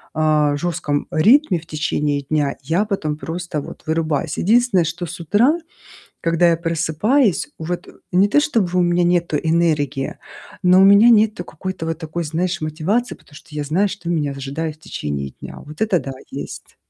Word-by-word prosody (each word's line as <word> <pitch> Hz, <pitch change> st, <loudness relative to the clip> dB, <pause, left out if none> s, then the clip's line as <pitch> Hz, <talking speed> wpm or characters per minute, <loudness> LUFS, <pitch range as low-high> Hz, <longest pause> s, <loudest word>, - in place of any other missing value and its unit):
а, 150 Hz, -2 st, +2 dB
жестком 160 Hz, -3 st, -2 dB
ритме 215 Hz, -, +4 dB
в 165 Hz, -, -16 dB
течение 150 Hz, -2 st, -1 dB
дня, 145 Hz, 0 st, -1 dB
я 165 Hz, +8 st, +1 dB
потом 160 Hz, -8 st, -2 dB
просто 165 Hz, 0 st, -4 dB
вот -, -, -10 dB
вырубаюсь. 160 Hz, -1 st, -1 dB
Единственное, 220 Hz, -2 st, +3 dB
что 170 Hz, +2 st, -4 dB
с 175 Hz, +2 st, -8 dB
утра, 235 Hz, -, +3 dB, 0.6 s
когда 170 Hz, +1 st, +3 dB
я 165 Hz, -, +2 dB
просыпаюсь, 170 Hz, -, +1 dB
вот 175 Hz, +2 st, -4 dB, 0.2 s
не 190 Hz, +3 st, +4 dB
то 295 Hz, -, +4 dB
чтобы 210 Hz, -, 0 dB
у -, -, +4 dB
меня 175 Hz, 0 st, +2 dB
нету 170 Hz, -3 st, +1 dB
энергии, 155 Hz, -5 st, 0 dB, 0.5 s
но 180 Hz, +1 st, +6 dB
у -, -, +7 dB
меня 200 Hz, +4 st, +7 dB
нету 215 Hz, -5 st, +3 dB
какой-то 170 Hz, 0 st, -6 dB
вот 165 Hz, -, -2 dB
такой, 165 Hz, +1 st, -4 dB
знаешь, 175 Hz, +4 st, -2 dB
мотивации, 170 Hz, +11 st, -1 dB
потому 145 Hz, -, -20 dB
что -, -, -14 dB
я 150 Hz, -, -2 dB
знаю, 180 Hz, +8 st, +1 dB
что 185 Hz, -3 st, -8 dB
меня 150 Hz, -5 st, 0 dB
ожидает 140 Hz, +3 st, -4 dB
в 155 Hz, -, -33 dB
течение 70 Hz, -, -4 dB
дня. -, -, -8 dB
Вот 150 Hz, +6 st, -11 dB
это 200 Hz, -6 st, +2 dB
да, 135 Hz, -, -6 dB, 0.2 s
есть. -, -, -8 dB
165 Hz, 175 wpm, -20 LUFS, 155-185 Hz, 0.6 s, у